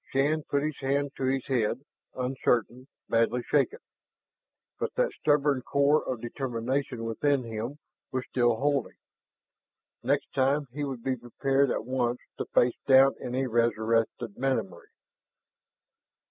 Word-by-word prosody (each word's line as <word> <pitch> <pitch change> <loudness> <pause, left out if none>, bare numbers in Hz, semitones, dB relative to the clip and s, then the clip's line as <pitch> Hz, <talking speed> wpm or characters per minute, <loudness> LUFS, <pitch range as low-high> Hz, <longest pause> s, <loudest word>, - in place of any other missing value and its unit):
Shann 145 +4 +1
put 140 0 +1
his 155 -1 -3
hand 140 +1 0
to 135 - -1
his 130 0 0
head, 125 +1 0 0.3
uncertain, 125 -1 0 0.2
badly 115 +2 +2
shaken. 445 - +1 1.0
But - - -3
that - - +2
stubborn 145 -3 +2
core 140 +3 +2
of 125 -3 -4
determination 125 0 -3
within 130 +4 +1
him 115 +4 -5 0.3
was 130 -1 -1
still 120 -2 +2
holding. 140 +1 0 1.0
Next 140 +3 0
time 140 +2 +2
he 145 +1 -3
would 130 -4 -4
be 130 -1 0
prepared 135 +3 +1
at 115 - -2
once 125 -1 0 0.2
to - - -1
face 120 0 +2
down 135 0 +7
any 130 +2 -1
resurrected 115 -2 0
memory. 115 -10 -2
130 Hz, 130 wpm, -28 LUFS, 120-140 Hz, 1.0 s, down